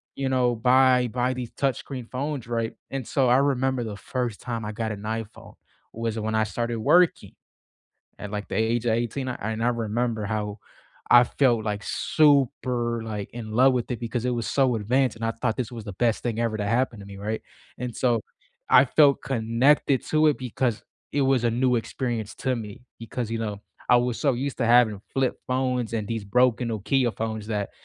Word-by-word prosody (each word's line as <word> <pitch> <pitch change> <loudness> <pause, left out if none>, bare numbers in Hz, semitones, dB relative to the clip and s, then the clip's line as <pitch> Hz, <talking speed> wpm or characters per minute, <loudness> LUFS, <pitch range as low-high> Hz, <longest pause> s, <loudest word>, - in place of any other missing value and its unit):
you 135 -1 -2
know, 125 -2 +2
buy 125 +1 +4
buy 125 +2 -1
these 125 -2 -6
touchscreen 130 -2 -3
phones, 135 -1 -3
right, 115 -1 -2 0.2
and 135 -3 -4
so, 135 -2 +2
I 125 - +5
remember 130 -2 +1
the 105 -3 -6
first 120 0 -3
time 115 -3 -4
I 105 - -3
got 110 +1 -3
an 105 -2 -6
iPhone 110 0 -6 0.4
was 115 0 -3
when 110 0 -2
I 110 - +3
started 115 +2 -3
working 175 +10 +3 0.9
at, 105 - -7
like, 105 -1 -5
the - - -5
age 115 +2 +1
of 115 - +3
18 120 +4 -2
and 110 -2 -3
I - - +3
remember 115 -1 -1
how 105 0 -3 0.5
I 120 0 +8
felt, 120 -3 +1
like, 105 -1 -2
super, 125 -5 +2
like, 105 -2 -5
in 115 -2 -7
love 130 +4 +5
with 125 0 -2
it 120 - -2
because 120 0 -3
it - - +1
was 120 -2 -2
so 130 -4 +2
advanced 125 +3 +1
and 115 - -5
I 115 - +1
thought 115 -1 -2
this 125 -1 -3
was 115 -3 -7
the 100 -3 -7
best 115 +2 +1
thing 115 -2 -2
ever 115 -2 0
to 105 - -2
happen 115 0 0
to 100 - -10
me, 100 0 -10
right, 105 +2 -3 0.4
and 125 -1 -4
so, 120 -4 +1 0.5
I 125 - +8
felt 140 +1 +4
connected 130 +3 +2
to 155 0 +3
it 150 - +1
because 120 -3 -2 0.3
it 145 - +1
was 135 -2 +2
a 120 - +3
new 125 +2 +2
experience 115 -1 -3
to 130 -1 -1
me 110 0 -8 0.2
because, 115 0 -4
you 115 - -1
know, 105 -3 -4 0.3
I 125 - +7
was 120 -1 0
so 140 -4 +2
used 135 +3 -3
to 120 - +1
having 115 -4 +4
flip 135 -2 +1
phones 125 -2 -1
and 110 -2 -2
these 115 -3 -3
broken 125 +3 +2
Nokia 120 +3 +1
phones 110 -1 -4
that, 105 -2 -2
120 Hz, 205 wpm, -25 LUFS, 110-130 Hz, 0.9 s, I